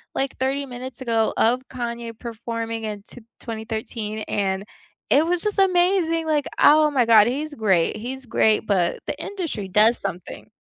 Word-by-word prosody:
like 270 Hz, 0 st, -1 dB
30 270 Hz, +2 st, 0 dB
minutes 255 Hz, 0 st, -8 dB
ago 230 Hz, -3 st, +1 dB
of 245 Hz, +3 st, +3 dB
Kanye 235 Hz, -2 st, -5 dB
performing 230 Hz, -1 st, -5 dB
in 210 Hz, -2 st, -5 dB
t 245 Hz, -, -13 dB, 0.2 s
2013 220 Hz, -1 st, -5 dB
and 195 Hz, -1 st, -1 dB, 0.5 s
it 295 Hz, -, +5 dB
was 345 Hz, 0 st, 0 dB
just 420 Hz, -1 st, -1 dB
amazing. 355 Hz, -3 st, +2 dB
Like, 300 Hz, -3 st, 0 dB
oh 305 Hz, +1 st, +6 dB
my 265 Hz, -5 st, +2 dB
God, 220 Hz, -2 st, +6 dB
he's 295 Hz, +5 st, -3 dB
great. 200 Hz, -, +1 dB
He's 260 Hz, +4 st, -6 dB
great, 220 Hz, -2 st, +3 dB
but 185 Hz, -5 st, +1 dB
the -, -, -3 dB
industry 335 Hz, -, -4 dB
does 215 Hz, +5 st, +4 dB
something. 180 Hz, -3 st, -7 dB
235 Hz, 160 wpm, -23 LUFS, 220-285 Hz, 0.5 s, oh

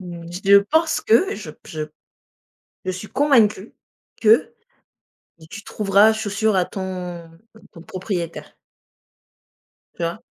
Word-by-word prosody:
Mmh, 170 Hz, -2 st, -9 dB
je 195 Hz, +3 st, +4 dB
pense 315 Hz, +10 st, +1 dB
que, 365 Hz, -, +3 dB
je 180 Hz, -7 st, -8 dB
p 155 Hz, -, -19 dB
je 155 Hz, -1 st, -5 dB, 1.0 s
je 185 Hz, -, -1 dB
suis 185 Hz, +3 st, -7 dB
convaincue 230 Hz, -8 st, +2 dB, 0.5 s
que 225 Hz, -, +4 dB, 0.9 s
mais 160 Hz, -, -15 dB
tu 215 Hz, +6 st, -10 dB
trouveras 210 Hz, +1 st, +3 dB
chaussure 220 Hz, -1 st, -1 dB
à 180 Hz, -, +2 dB
ton 180 Hz, -3 st, -6 dB, 0.2 s
ton 220 Hz, -, -18 dB
ton 170 Hz, -, -13 dB
propriétaire. 180 Hz, -2 st, -5 dB, 1.4 s
Tu 170 Hz, -, -6 dB
vois? 170 Hz, +7 st, -3 dB
195 Hz, 125 wpm, -21 LUFS, 175-220 Hz, 1.4 s, je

